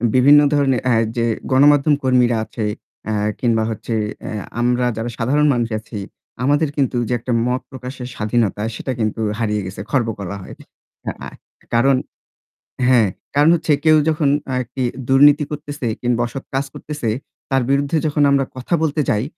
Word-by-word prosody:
বিভিন্ন 145 Hz, +3 st, +7 dB
ধরনের 135 Hz, -4 st, +2 dB
আ -, -, +4 dB, 0.2 s
যে 115 Hz, -, +2 dB, 0.3 s
গণমাধ্যম 145 Hz, +2 st, +5 dB
কর্মীরা 125 Hz, -3 st, +3 dB
আছে 110 Hz, -3 st, -4 dB, 0.5 s
আ -, -, 0 dB, 0.3 s
কিংবা 115 Hz, -3 st, +2 dB
হচ্ছে 110 Hz, +2 st, -5 dB, 0.3 s
এ -, -, -4 dB, 0.3 s
আমরা 125 Hz, +1 st, +2 dB
যারা 115 Hz, +2 st, -3 dB
সাধারণ 145 Hz, +6 st, +2 dB
মানুষ 120 Hz, -1 st, -1 dB
আছি 110 Hz, 0 st, -9 dB, 0.5 s
আমাদের 145 Hz, +2 st, +2 dB
কিন্তু 135 Hz, -3 st, +1 dB
যে -, -, +1 dB
একটা 120 Hz, +1 st, -3 dB
মত 125 Hz, +1 st, 0 dB
প্রকাশের 130 Hz, -1 st, -7 dB
স্বাধীনতা 110 Hz, -1 st, 0 dB
সেটা 130 Hz, -, -4 dB
কিন্তু 110 Hz, +1 st, -1 dB, 0.2 s
হারিয়ে 105 Hz, -2 st, 0 dB
গেছে। 95 Hz, +1 st, -7 dB
খর্ব 125 Hz, -5 st, +2 dB
করা 100 Hz, +1 st, -5 dB
হয়। -, -, -10 dB, 0.7 s
আ -, -, -5 dB, 0.5 s
কারণ 135 Hz, +3 st, +4 dB, 0.9 s
হ্যাঁ, 120 Hz, -5 st, +5 dB, 0.3 s
কারণ 145 Hz, +3 st, +5 dB
হচ্ছে 160 Hz, -2 st, +1 dB
কেউ 155 Hz, 0 st, +6 dB
যখন 150 Hz, -2 st, +1 dB, 0.3 s
আরকি 125 Hz, +1 st, -3 dB, 0.3 s
দুর্নীতি 145 Hz, +3 st, +6 dB
করতেছে 145 Hz, -3 st, -5 dB, 0.2 s
কিংবা 120 Hz, -1 st, +1 dB
অসৎ 135 Hz, +3 st, -7 dB
কাজ 135 Hz, +1 st, 0 dB
করতেছে 150 Hz, -7 st, -4 dB, 0.4 s
তার 135 Hz, -2 st, +2 dB
বিরুদ্ধে 140 Hz, +3 st, +1 dB
যখন 150 Hz, 0 st, +1 dB
আমরা 135 Hz, -1 st, +3 dB
কথা 130 Hz, +7 st, -4 dB
বলতে 150 Hz, 0 st, +1 dB
যাই, 105 Hz, 0 st, +1 dB
130 Hz, 160 wpm, -19 LUFS, 115-145 Hz, 0.9 s, বিভিন্ন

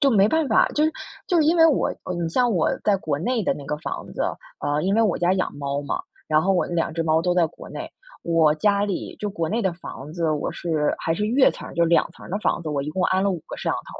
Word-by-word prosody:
就 280 Hz, -, +4 dB
没 200 Hz, -3 st, +5 dB
办 320 Hz, -1 st, +1 dB
法 -, -, +4 dB
就 300 Hz, -, 0 dB
是 315 Hz, -, +3 dB, 0.4 s
就 360 Hz, -, +1 dB
是 315 Hz, -, +4 dB
因 325 Hz, +3 st, +3 dB
为 325 Hz, -1 st, +7 dB
我 310 Hz, -, +2 dB, 0.3 s
你 170 Hz, -, 0 dB
像 245 Hz, +8 st, +2 dB
我 180 Hz, -7 st, +2 dB
在 205 Hz, -2 st, +3 dB
国 155 Hz, -6 st, -2 dB
内 230 Hz, +7 st, 0 dB
的 -, -, +2 dB
那 145 Hz, -, -9 dB
个 150 Hz, -, -2 dB
房 -, -, -5 dB
子， -, -, -1 dB, 0.4 s
啊， 145 Hz, +1 st, 0 dB
因 195 Hz, +2 st, +1 dB
为 225 Hz, -, +4 dB
我 210 Hz, -5 st, +2 dB
家 175 Hz, +1 st, +2 dB
养 185 Hz, -, -1 dB
猫 140 Hz, 0 st, -3 dB
嘛， 145 Hz, -, -2 dB, 0.3 s
然 155 Hz, 0 st, +3 dB
后 195 Hz, -, +2 dB
我 180 Hz, -, +1 dB
那 175 Hz, -, -5 dB
两 165 Hz, -1 st, 0 dB
只 165 Hz, +1 st, -1 dB
猫 160 Hz, 0 st, +3 dB
都 175 Hz, +1 st, +1 dB
在 175 Hz, -2 st, +4 dB
国 -, -, -12 dB
内， -, -, -7 dB, 0.3 s
我 160 Hz, -3 st, +3 dB
家 200 Hz, +5 st, +2 dB
里 200 Hz, -3 st, -4 dB
就 210 Hz, -, -2 dB
国 170 Hz, -5 st, -2 dB
内 225 Hz, +6 st, 0 dB
的 190 Hz, -5 st, 0 dB
房 150 Hz, -4 st, -9 dB
子， 165 Hz, -1 st, 0 dB
我 150 Hz, -1 st, -1 dB
是 155 Hz, -3 st, 0 dB
还 165 Hz, -, -1 dB
是 210 Hz, +4 st, -1 dB
越 260 Hz, +4 st, +4 dB
层 -, -, -9 dB
儿， -, -, -10 dB
就 170 Hz, -, +3 dB
两 170 Hz, 0 st, +3 dB
层 -, -, -14 dB
儿 -, -, -10 dB
的 200 Hz, -, -1 dB
房 210 Hz, -, 0 dB
子， 160 Hz, -, -5 dB
我 140 Hz, -2 st, -1 dB
一 145 Hz, -, -5 dB
共 180 Hz, +3 st, -1 dB
安 185 Hz, +1 st, +2 dB
了 200 Hz, -, +2 dB
五 175 Hz, -4 st, -3 dB
个 -, -, -7 dB
摄 -, -, -3 dB
像 -, -, 0 dB
头 -, -, -6 dB
175 Hz, 315 characters per minute, -23 LUFS, 160-210 Hz, 0.4 s, 为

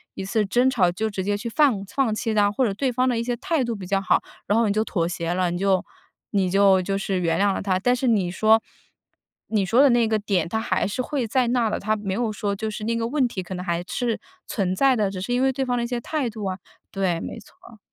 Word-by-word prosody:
一 190 Hz, -, -5 dB
次 210 Hz, +2 st, 0 dB
争 245 Hz, +6 st, +3 dB
吵 195 Hz, -9 st, +2 dB
就 220 Hz, +5 st, -2 dB
直 195 Hz, -3 st, -4 dB
接 205 Hz, +1 st, 0 dB
去 235 Hz, -, -6 dB
放 235 Hz, -6 st, +2 dB
放 235 Hz, +2 st, 0 dB
弃 220 Hz, +1 st, -2 dB
他， 205 Hz, -1 st, +3 dB
或 255 Hz, +5 st, +1 dB
者 205 Hz, -, 0 dB
对 255 Hz, +5 st, -1 dB
方 250 Hz, +1 st, +1 dB
的 245 Hz, -2 st, +1 dB
一 230 Hz, -, -1 dB
些 245 Hz, -, -1 dB
态 320 Hz, 0 st, 0 dB
度 235 Hz, -1 st, -2 dB
比 190 Hz, -4 st, -7 dB
较 195 Hz, 0 st, +1 dB
好， 195 Hz, -, +2 dB, 0.2 s
然 210 Hz, +3 st, +2 dB
后 230 Hz, -, +3 dB
你 200 Hz, -, +1 dB
就 215 Hz, -, +1 dB
妥 170 Hz, -6 st, -1 dB
协 170 Hz, -1 st, -2 dB
了， 180 Hz, -1 st, +1 dB
你 175 Hz, -, -2 dB
就 190 Hz, 0 st, +1 dB, 0.5 s
你 195 Hz, -3 st, +1 dB
就 195 Hz, 0 st, +4 dB
就 195 Hz, +2 st, -1 dB
是 195 Hz, -1 st, -1 dB
原 165 Hz, -1 st, +1 dB
谅 200 Hz, 0 st, +3 dB
了 -, -, -3 dB
他。 185 Hz, -2 st, 0 dB
但 245 Hz, +5 st, +2 dB
是 250 Hz, -, -2 dB
你 205 Hz, -7 st, +2 dB
说 220 Hz, +4 st, +4 dB, 0.9 s
你 210 Hz, -3 st, +1 dB
说 230 Hz, +8 st, +4 dB
的 285 Hz, -, +6 dB
那 240 Hz, -1 st, +3 dB
个 220 Hz, -1 st, +1 dB
点 195 Hz, -5 st, -1 dB
他 220 Hz, -, -1 dB
还 225 Hz, -, 0 dB
是 205 Hz, +6 st, -2 dB
会 265 Hz, -1 st, -2 dB
在 245 Hz, +2 st, +1 dB
那 245 Hz, 0 st, +1 dB
儿 220 Hz, -, 0 dB
的， -, -, -1 dB
他 215 Hz, +2 st, 0 dB
没 205 Hz, -3 st, -4 dB
有 230 Hz, +3 st, 0 dB
说 210 Hz, -1 st, -2 dB
就 215 Hz, +2 st, -3 dB
是 215 Hz, 0 st, -6 dB
那 230 Hz, +2 st, 0 dB
个 230 Hz, -, -1 dB
问 270 Hz, +1 st, +1 dB
题 220 Hz, -6 st, -3 dB
可 185 Hz, +1 st, -7 dB
能 180 Hz, 0 st, -6 dB
还 170 Hz, -1 st, -1 dB
是 235 Hz, -3 st, -2 dB, 0.3 s
存 185 Hz, -4 st, -1 dB
在 265 Hz, +3 st, +3 dB
的， 205 Hz, -2 st, +1 dB
只 190 Hz, -1 st, -6 dB
是 220 Hz, +6 st, -2 dB
因 250 Hz, -, +1 dB
为 265 Hz, 0 st, +2 dB
对 265 Hz, +1 st, -1 dB
方 250 Hz, -1 st, -1 dB
的 240 Hz, -, 0 dB
一 -, -, -3 dB
些 245 Hz, -1 st, -3 dB
态 290 Hz, -1 st, -2 dB
度 215 Hz, -1 st, -8 dB
啊 190 Hz, -1 st, -2 dB, 0.3 s
对， 185 Hz, -4 st, -1 dB
没 -, -, -6 dB
错。 225 Hz, +1 st, -17 dB
215 Hz, 305 characters per minute, -23 LUFS, 195-240 Hz, 0.9 s, 的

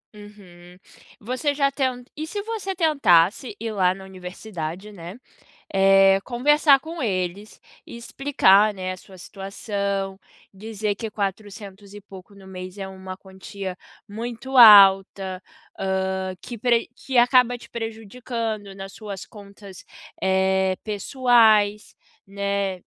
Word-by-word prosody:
Uhum. 180 Hz, -4 st, -15 dB, 0.4 s
Você 255 Hz, +6 st, -2 dB
já 275 Hz, -1 st, +1 dB
tent 255 Hz, -3 st, -2 dB
e 310 Hz, +1 st, -5 dB
se 410 Hz, -, -5 dB
você 425 Hz, -4 st, -4 dB
tentasse 260 Hz, -, +2 dB
ir 225 Hz, 0 st, -4 dB
lá 185 Hz, -3 st, +1 dB
na 195 Hz, -, -12 dB
universidade, 185 Hz, 0 st, -8 dB
né, 180 Hz, 0 st, -10 dB, 0.6 s
eh, 195 Hz, 0 st, +5 dB
conversar 280 Hz, +3 st, +3 dB
com 320 Hz, +3 st, -8 dB
eles, 195 Hz, -2 st, -3 dB, 0.3 s
explicar 230 Hz, -4 st, +2 dB
né, 185 Hz, -1 st, -4 dB
a -, -, -10 dB
sua 190 Hz, +1 st, -16 dB
situação, 195 Hz, 0 st, -4 dB, 0.3 s
dizer 210 Hz, +1 st, -4 dB
que 225 Hz, +1 st, -6 dB
400 200 Hz, 0 st, -6 dB
e 205 Hz, -, -10 dB
pouco 195 Hz, 0 st, -14 dB
no 195 Hz, -1 st, -15 dB
mês 185 Hz, +1 st, -9 dB
é 195 Hz, -1 st, -6 dB
uma 190 Hz, -1 st, -9 dB
quantia 190 Hz, 0 st, -8 dB, 0.3 s
muito 235 Hz, +5 st, -7 dB
alta, 195 Hz, -4 st, +7 dB, 0.4 s
hã, 190 Hz, -1 st, -2 dB
que 240 Hz, -, -8 dB
pre 235 Hz, -1 st, +1 dB
que 265 Hz, -1 st, -4 dB
acaba 245 Hz, 0 st, +4 dB
te -, -, -15 dB
prejudicando 225 Hz, -2 st, -5 dB
nas 195 Hz, 0 st, -9 dB
suas 200 Hz, -4 st, -8 dB
contas, 200 Hz, -3 st, -13 dB, 0.4 s
eh, 190 Hz, 0 st, +1 dB
pessoais, 215 Hz, -2 st, +2 dB, 0.3 s
né, 200 Hz, -2 st, -3 dB
200 Hz, 125 wpm, -23 LUFS, 190-235 Hz, 0.6 s, alta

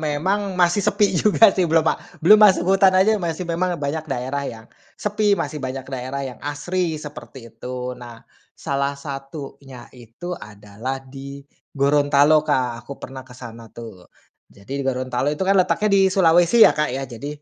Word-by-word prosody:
memang 185 Hz, +6 st, -1 dB
masih 175 Hz, +2 st, +3 dB
sepi 205 Hz, +1 st, +1 dB
juga, 205 Hz, +3 st, +4 dB
sih, 180 Hz, -3 st, 0 dB
belum 160 Hz, 0 st, +3 dB
ma -, -, +3 dB, 0.3 s
belum 215 Hz, +4 st, +7 dB
masuk 195 Hz, -4 st, +5 dB
hutan 195 Hz, 0 st, +5 dB
aja 195 Hz, +4 st, +4 dB
masih 170 Hz, +1 st, -3 dB
memang 175 Hz, +1 st, -1 dB
banyak 150 Hz, +2 st, -4 dB
daerah 135 Hz, +1 st, -3 dB
yang 110 Hz, -1 st, -10 dB, 0.3 s
sepi, 210 Hz, -1 st, +1 dB
masih 150 Hz, -6 st, -4 dB
banyak 130 Hz, 0 st, -5 dB
daerah 130 Hz, +2 st, -4 dB
yang 130 Hz, -2 st, -8 dB
asri 160 Hz, +3 st, -2 dB
seperti 135 Hz, -5 st, -11 dB
itu. 125 Hz, 0 st, -6 dB
Nah, 120 Hz, -2 st, -12 dB, 0.3 s
salah 140 Hz, 0 st, -2 dB
satunya 135 Hz, -2 st, -9 dB
itu 125 Hz, +9 st, -9 dB
adalah 105 Hz, -, -7 dB
di 140 Hz, +1 st, -10 dB, 0.3 s
Gorontalo 145 Hz, +2 st, +4 dB
Kak. 130 Hz, -6 st, -1 dB
Aku 135 Hz, +4 st, -10 dB
pernah 130 Hz, 0 st, -9 dB
ke 125 Hz, -1 st, -15 dB
sana 115 Hz, -2 st, -11 dB
tuh. 110 Hz, -6 st, -12 dB, 0.4 s
Jadi 120 Hz, +8 st, -7 dB
di -, -, -2 dB
Gorontalo 130 Hz, 0 st, -1 dB
itu 150 Hz, +5 st, -2 dB
kan 195 Hz, +1 st, +3 dB
letaknya 210 Hz, +3 st, +1 dB
di 195 Hz, -, +5 dB
Sulawesi 175 Hz, +3 st, +5 dB
ya, -, -, +6 dB
Kak, 150 Hz, 0 st, -1 dB
ya, 135 Hz, +2 st, -4 dB
jadi, 120 Hz, +2 st, -8 dB
140 Hz, 170 wpm, -21 LUFS, 130-175 Hz, 0.4 s, belum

